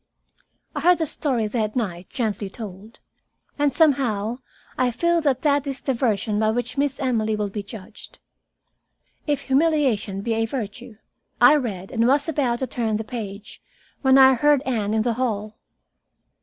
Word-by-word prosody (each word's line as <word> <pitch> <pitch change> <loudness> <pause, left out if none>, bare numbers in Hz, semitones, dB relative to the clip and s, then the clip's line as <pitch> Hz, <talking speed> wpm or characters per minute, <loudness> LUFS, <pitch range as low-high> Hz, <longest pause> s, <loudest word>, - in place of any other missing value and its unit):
I - - -1
heard 355 +3 +5
the 320 - 0
story 265 -6 0
that 215 -1 -2
night 185 -7 -3
gently 215 -5 -2
told, 210 +1 -10 0.6
and 290 -1 +3
somehow 250 -8 +1 0.4
I 255 -1 +1
feel 340 +7 +1
that 270 -4 0
that 285 -1 +2
is 270 -2 -3
the 265 - -1
version 215 -3 0
by 215 0 +2
which 245 +2 -2
Miss 280 -1 0
Emily 220 -5 0
will 210 -1 -3
be 210 - -4
judged. 200 -1 -11 1.1
"If 290 -2 0
humiliation 270 -9 +1
be 230 +2 -1
a 225 0 0
virtue 235 -1 -6 0.3
" - - -47
I - - +6
read 205 -10 -3
and 230 -1 +2
was 285 +3 +3
about 265 -7 0
to 260 - -2
turn 230 -3 -2
the 220 - -2
page, 215 -3 -7 0.4
when 265 -1 +5
I 265 0 +8
heard 290 +2 +3
Anne 220 -5 -1
in 220 - +2
the 240 0 0
hall. 215 -2 -3
240 Hz, 170 wpm, -23 LUFS, 215-275 Hz, 1.1 s, I